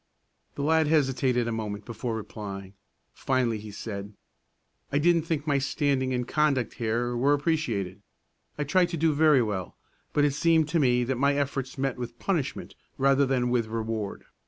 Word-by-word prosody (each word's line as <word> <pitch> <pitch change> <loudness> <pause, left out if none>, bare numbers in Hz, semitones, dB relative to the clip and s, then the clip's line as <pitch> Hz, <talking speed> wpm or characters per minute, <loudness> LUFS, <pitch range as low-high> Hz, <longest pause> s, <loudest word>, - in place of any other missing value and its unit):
The 140 - -3
lad 160 +1 +3
hesitated 130 -5 +2
a - - -1
moment 105 -2 -4
before 115 0 -4
replying. 100 -3 -7 0.4
Finally 125 -4 0
he 105 +1 -9
said, 100 0 -6 0.8
"I 140 - +2
didn't 165 +1 +3
think 155 -3 -1
my 145 -3 +2
standing 135 -1 0
and 125 -1 -1
conduct 145 -6 +1
here 120 +2 0
were 135 +4 +3
appreciated. 115 - -1 0.6
I 150 - 0
tried 175 +4 +2
to 170 - -3
do 160 0 +2
very 150 -3 +5
well, 95 -5 -4 0.3
but 145 - +3
it 145 - +2
seemed 160 +1 +3
to 165 - +1
me 125 -3 +3
that 125 0 -2
my 140 +1 +3
efforts 135 -2 -2
met 135 -2 -1
with 120 -1 -6
punishment 155 -6 -2 0.2
rather 135 0 +3
than 125 -2 +1
with 120 -3 +1
reward. 110 -2 -3
130 Hz, 170 wpm, -27 LUFS, 115-145 Hz, 0.8 s, very